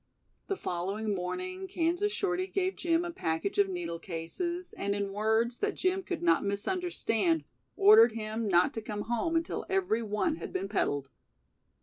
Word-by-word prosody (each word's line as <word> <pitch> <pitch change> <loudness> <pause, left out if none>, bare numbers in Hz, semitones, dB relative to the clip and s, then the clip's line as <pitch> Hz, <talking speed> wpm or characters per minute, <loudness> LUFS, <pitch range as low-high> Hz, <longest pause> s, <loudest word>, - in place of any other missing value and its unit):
The 395 - -1
following 200 - -2
morning 370 - -4
Kansas 355 +3 0
Shorty 370 -2 -1
gave 380 -1 -1
Jim 335 0 +1
a 345 - -3
package 170 - -2
of 200 -1 +4
needle 170 -2 -4
cases 340 - -4
and 200 0 -1
in 200 -1 -2
words 220 +3 +1
that 420 0 0
Jim 370 +1 +1
could 355 -2 -4
not 345 +1 +4
misunderstand 325 - 0 0.3
ordered 425 +3 +8
him 220 0 -3
not 175 -2 +4
to 225 - -4
come 210 -1 -4
"home" 240 +9 -1
until 330 0 -1
every 365 - +1
one 225 +10 0
had - - -7
been 195 - -2
peddled. 145 -9 -1
230 Hz, 160 wpm, -30 LUFS, -, 0.3 s, ordered